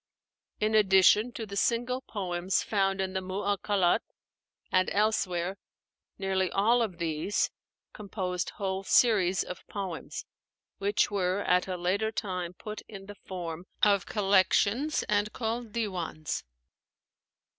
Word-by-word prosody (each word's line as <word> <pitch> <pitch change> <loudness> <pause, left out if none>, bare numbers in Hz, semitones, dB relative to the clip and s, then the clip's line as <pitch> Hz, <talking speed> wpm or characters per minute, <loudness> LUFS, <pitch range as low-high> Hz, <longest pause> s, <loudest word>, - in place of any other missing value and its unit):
In 215 +1 +1
addition 210 +2 +5
to 225 - -5
the 200 -1 -8
single 245 +4 +1
poems 185 -5 -1
found 195 -2 +1
in 190 -1 -1
the 190 - -1
'Mu 185 0 -6
'allakât' 200 -2 +2 0.7
and 185 0 +3
elsewhere, 195 -3 0 0.6
nearly 190 -1 0
all 225 +7 +3
of 200 -7 -2
these 165 +4 0 0.4
composed 185 -3 -3
whole 190 -1 -2
series 195 -3 +3
of 180 - -8
poems, 190 -5 -5 0.5
which 205 +4 +1
were 190 -1 0
at 180 -1 +2
a 185 -1 -3
later 195 +5 0
time 180 -5 -3
put 215 +3 -7
in 195 -3 -10
the 205 - -8
form 175 -3 -7 0.2
of 200 -2 +4
collections 205 - +2
and 210 0 0
called 230 0 -3
'Diwans.' 185 -9 -3
195 Hz, 125 wpm, -29 LUFS, 185-210 Hz, 0.7 s, addition